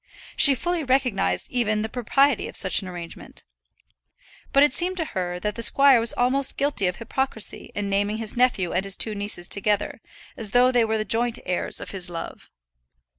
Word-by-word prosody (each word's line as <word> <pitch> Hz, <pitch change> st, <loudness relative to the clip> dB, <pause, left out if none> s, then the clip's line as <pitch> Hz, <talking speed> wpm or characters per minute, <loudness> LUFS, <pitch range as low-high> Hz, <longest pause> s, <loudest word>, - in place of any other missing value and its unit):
She 280 Hz, -2 st, +7 dB
fully 345 Hz, +4 st, -2 dB
recognized 250 Hz, -, 0 dB
even 215 Hz, -3 st, 0 dB
the -, -, -2 dB
propriety 255 Hz, +3 st, +1 dB
of -, -, -10 dB
such 190 Hz, +1 st, +3 dB
an 190 Hz, -, -8 dB
arrangement. 175 Hz, -2 st, -9 dB, 1.1 s
But 275 Hz, -, +5 dB
it 290 Hz, -, +3 dB
seemed 365 Hz, +3 st, -1 dB
to 325 Hz, -, -1 dB
her 180 Hz, -1 st, -3 dB
that 210 Hz, +1 st, -2 dB
the 230 Hz, -, -6 dB
squire 275 Hz, +1 st, +5 dB
was 230 Hz, 0 st, +2 dB
almost 265 Hz, +2 st, 0 dB
guilty 280 Hz, -9 st, +1 dB
of 180 Hz, -, -2 dB
hypocrisy 230 Hz, -1 st, -4 dB
in 205 Hz, 0 st, -3 dB
naming 205 Hz, +2 st, 0 dB
his 220 Hz, -1 st, -4 dB
nephew 240 Hz, -8 st, +1 dB
and 180 Hz, +2 st, 0 dB
his 195 Hz, -1 st, 0 dB
two 220 Hz, -, +2 dB
nieces 200 Hz, -4 st, -3 dB
together, 205 Hz, 0 st, -1 dB, 0.3 s
as 225 Hz, -6 st, -4 dB
though 250 Hz, +1 st, +5 dB
they 240 Hz, -2 st, +3 dB
were 220 Hz, 0 st, -1 dB
the 215 Hz, -, -2 dB
joint 235 Hz, +3 st, 0 dB
heirs 180 Hz, -1 st, -3 dB
of -, -, -7 dB
his 185 Hz, -2 st, -4 dB
love. 170 Hz, -1 st, -8 dB
220 Hz, 190 wpm, -23 LUFS, 195-255 Hz, 1.1 s, She